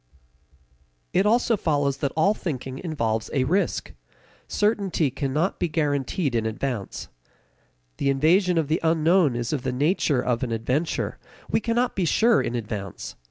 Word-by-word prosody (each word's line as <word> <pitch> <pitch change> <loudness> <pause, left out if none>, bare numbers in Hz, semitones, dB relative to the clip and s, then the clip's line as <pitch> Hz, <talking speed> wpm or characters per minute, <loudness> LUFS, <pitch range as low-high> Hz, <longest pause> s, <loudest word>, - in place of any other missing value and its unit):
It 195 - +3
also 235 +1 +3
follows 145 -7 0
that 140 -1 -1
all 195 +6 +4
thinking 135 - -5
involves 115 -10 -2
a 135 - +2
risk. 185 +9 0 0.5
Certainty 200 - +1
cannot 145 +7 -1
be 175 - +1
guaranteed 145 -1 -1
in 115 -1 0
advance. 110 -2 -4 0.9
The 140 - 0
invasion 170 +6 +3
of 160 -3 +1
the 155 +3 +1
unknown 165 -2 +3
is 120 +3 -2
of 145 - -1
the 130 - -2
nature 145 +1 +1
of 125 -1 0
an 125 - -2
adventure; 125 +8 -1 0.3
we - - +3
cannot 240 +2 0
be 190 - 0
sure 225 +7 +4
in 120 - -3
advance. 105 -5 -5
150 Hz, 150 wpm, -24 LUFS, 130-180 Hz, 0.9 s, all